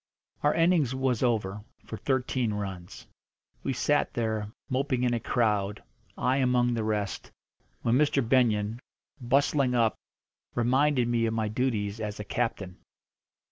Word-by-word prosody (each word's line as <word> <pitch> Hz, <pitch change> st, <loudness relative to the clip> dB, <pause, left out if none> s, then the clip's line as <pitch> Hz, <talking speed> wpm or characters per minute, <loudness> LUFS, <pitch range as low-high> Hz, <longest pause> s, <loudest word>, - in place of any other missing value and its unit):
Our 145 Hz, -, +2 dB
innings 165 Hz, -6 st, +3 dB
was 130 Hz, -3 st, 0 dB
over 105 Hz, -4 st, 0 dB, 0.2 s
for -, -, -6 dB
thirteen 125 Hz, -2 st, -1 dB
runs. 95 Hz, -4 st, -6 dB, 0.6 s
We -, -, -2 dB
sat 145 Hz, +3 st, +1 dB
there, 110 Hz, -3 st, -2 dB, 0.2 s
moping 130 Hz, -1 st, 0 dB
in 125 Hz, -1 st, +2 dB
a 120 Hz, -, 0 dB
crowd, 105 Hz, -4 st, 0 dB, 0.3 s
I 130 Hz, +2 st, +1 dB
among 125 Hz, -2 st, +2 dB
the 115 Hz, -2 st, -1 dB
rest, 105 Hz, -2 st, -2 dB, 0.5 s
when 120 Hz, +3 st, +3 dB
Mr. 140 Hz, -4 st, +2 dB
Benyon, 115 Hz, -3 st, +2 dB, 0.4 s
bustling 135 Hz, +1 st, +2 dB
up, 115 Hz, -2 st, +3 dB, 0.6 s
reminded 130 Hz, +2 st, +2 dB
me 120 Hz, -1 st, +1 dB
of 110 Hz, -, -2 dB
my 110 Hz, -1 st, 0 dB
duties 110 Hz, -3 st, -1 dB
as 105 Hz, -1 st, -4 dB
a -, -, -3 dB
captain. 100 Hz, -5 st, -3 dB
120 Hz, 140 wpm, -28 LUFS, 105-130 Hz, 0.6 s, innings